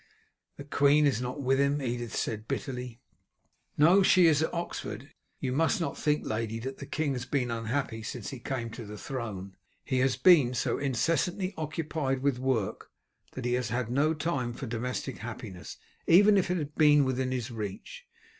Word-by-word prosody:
"The - - -7
queen 145 +1 +4
is 130 -5 +1
not 125 +3 -4
with 135 +1 +2
him," 140 +1 +2
Edith 120 -3 -3
said 110 0 -3
bitterly. 125 -3 -4 0.8
"No, 175 +7 +6
she 185 -1 +6
is 155 -2 +4
at 160 - 0
Oxford. 170 0 -5 0.3
You 130 - -2
must 160 +6 +2
not 165 - -2
think, 150 0 0
lady, 110 0 -2
that 130 +4 -6
the - - -7
king 155 -3 -1
has 125 -1 -5
been 125 -4 0
unhappy 115 +1 -2
since 110 +2 -6
he 135 - -7
came 120 -2 -4
to 115 - -7
the 105 +1 -8
throne. 105 -7 -6 0.3
He 130 - 0
has 130 -1 +2
been 135 -5 +5
so - - 0
incessantly 170 - 0
occupied 155 -4 -2
with 140 -3 +1
work 125 -6 -1 0.4
that 130 - -6
he 120 - +1
has 125 -2 0
had 120 0 -2
no 150 +5 +2
time 145 -6 -2
for 130 - -6
domestic 125 +2 -4
happiness, 110 -5 -8 0.3
even 205 +5 +7
if 190 -3 +2
it 180 - +1
had 150 -2 -4
been 150 -2 +5
within 130 0 -1
his 125 -1 -3
reach. 115 - -7
130 Hz, 185 wpm, -29 LUFS, 120-150 Hz, 0.8 s, even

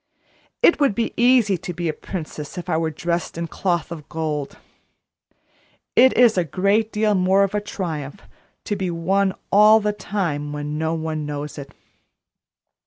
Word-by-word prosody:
It 340 - +5
would 275 -8 +2
be 230 - -1
easy 235 -6 +3
to 180 - -6
be 175 0 -2
a 155 - 0
princess 155 -2 -7
if 180 - -6
I - - +2
were 160 0 0
dressed 170 +2 -3
in 170 - -2
cloth 175 0 -2
of 155 -4 -8
gold; 155 -3 -3 1.4
it 260 +1 +5
is 235 -6 +5
a - - +2
great 200 +7 +1
deal 210 0 +1
more 190 +1 +3
of 195 - -1
a 210 - 0
triumph 175 -5 -5 0.4
to 205 - -2
be 190 -2 -2
one 190 +3 0 0.2
all 210 +2 +7
the 210 -1 -1
time 170 -8 -3
when 150 +1 -4
no 160 +1 0
one 155 -2 -3
knows 145 0 -5
it. 140 0 -10
180 Hz, 170 wpm, -22 LUFS, 155-205 Hz, 1.4 s, all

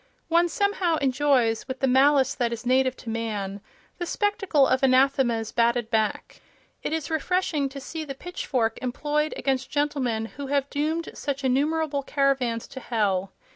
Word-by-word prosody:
One 340 +1 +3
somehow 390 -3 +1
enjoys, 265 -5 +1
with 260 -1 -5
the - - +2
malice 270 +1 +4
that 240 -4 -1
is 235 0 -5
native 260 +1 +2
to 230 - -8
man, 205 -3 -3 0.4
the 350 - -3
spectacle 400 - +2
of 260 0 +2
anathemas 255 -4 +3
batted 235 0 +1
back; 220 -2 -1 0.4
it - - -3
is 320 0 -3
refreshing 320 -3 0
to 275 +1 -8
see 315 +4 -6
the 275 -3 -6
pitchfork 260 -8 -2
employed 295 +4 -1
against 265 -1 -1
gentlemen 275 -6 0
who 275 +4 -8
have 280 0 0
doomed 315 +3 -1
such 280 -1 -4
innumerable 285 +3 +1
caravans 270 -5 0
to 260 - -8
hell. 195 -6 -1
270 Hz, 155 wpm, -25 LUFS, 240-300 Hz, 0.4 s, malice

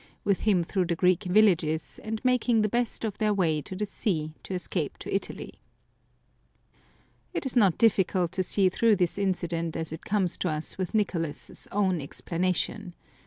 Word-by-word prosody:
" - - -35
with 200 -4 +1
him 180 -4 +3
through 185 +2 0
the 170 0 -1
Greek 180 +3 +2
villages, 180 -5 +2
and 220 +3 -4
making 245 -3 +3
the - - +3
best 240 +1 -1
of 210 -2 -4
their 210 -1 +2
way 160 -6 +1
to 185 - -8
the 210 +3 -1
sea 160 -6 -2
to 190 - -5
escape 180 - -3
to - - -6
Italy. - - -4 1.7
It - - -2
is 265 - -2
not 200 -8 +4
difficult 190 -5 +2
to 190 - -1
see 190 +1 +4
through 220 +4 +3
this 180 0 0
incident 170 -4 -1
as 160 -1 -4
it 160 - -8
comes 195 -4 0
to 180 - 0
us 155 0 -3
with 185 +3 -4
Nicolas's 165 -8 -2
own 190 -5 +1
explanation. 180 +5 -2
185 Hz, 175 wpm, -27 LUFS, 170-210 Hz, 1.7 s, not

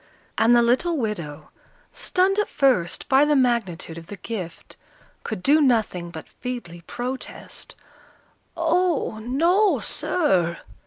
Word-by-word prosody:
And 230 +2 +4
the 240 - +5
little 285 +8 +2
widow, 170 - -4 0.4
stunned 380 +2 +1
at 420 - 0
first 250 - +1
by 270 +1 +5
the 295 0 +3
magnitude 215 -11 0
of 165 - -14
the 205 - -8
gift, 180 -4 -7 0.5
could 215 -5 -5
do 300 +3 +5
nothing 220 -10 +1
but 160 -2 -9
feebly 240 -10 -6
protest, 255 +2 -6 0.8
"Oh, 335 -8 +1
no, 335 - +2
sir!" 185 - +1
240 Hz, 120 wpm, -23 LUFS, 180-300 Hz, 0.8 s, the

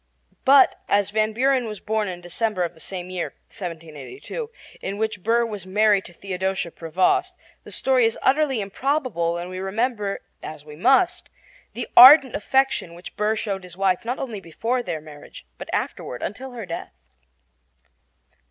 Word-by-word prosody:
But, 275 0 +6
as 205 0 +2
Van 215 0 +1
Buren 255 +1 +1
was 210 -2 -6
born 220 -1 -1
in 180 -1 -6
December 185 +2 -1
of 170 - -3
the - - -19
same 180 +2 -6
year 180 -2 -4
(1782) 175 - -7 0.3
in 195 +1 -4
which 220 -3 -2
Burr 235 +4 +2
was 205 -5 -7
married 205 0 +3
to 175 - -12
Theodosia 190 -1 -3
Prevost, 185 - +1 0.3
the - - -12
story 255 -3 +3
is 225 - -3
utterly 270 -4 +2
improbable 200 - -1
when 175 +1 -4
we 185 0 -6
remember, 205 +1 -2 0.2
as 150 -1 -9
we 150 -1 -11
must, 340 - +2 0.4
the - - -5
ardent 260 0 +10
affection 265 -8 0
which 175 - -11
Burr 210 +1 +1
showed 200 -3 -3
his 180 -1 -11
wife, 190 +1 +1
not 245 +3 -3
only 235 -6 -5
before 225 +8 -2
their 170 -8 -4
marriage, 150 -1 -13
but - - -8
afterward 125 - -3
until 255 +6 -6
her 230 -4 -6
death. 170 - -6
205 Hz, 160 wpm, -23 LUFS, 180-245 Hz, 0.4 s, ardent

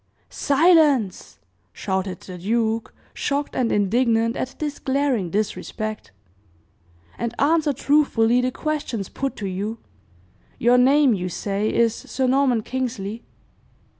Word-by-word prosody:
"Silence!" 285 - +2 0.3
shouted 190 -2 -3
the 180 -2 -9
duke, 225 +3 -1 0.2
shocked 285 0 -2
and 245 -3 +1
indignant 230 +2 +2
at 260 +1 -4
this 295 -2 -4
glaring 265 -8 0
disrespect, 215 - -3 1.1
"and 235 0 -4
answer 305 +1 +3
truthfully 250 -4 +2
the 250 - 0
questions 260 - -3
put 275 0 -3
to 205 - -6
you. 200 +4 -3 0.8
Your 245 +1 +4
name, 270 0 +5
you 180 -2 -2
say, 200 +4 -2
is 230 -1 +2
Sir 260 +2 -3
Norman 255 -3 +2
Kingsley?" 235 -4 -4
235 Hz, 115 wpm, -22 LUFS, 210-275 Hz, 1.1 s, name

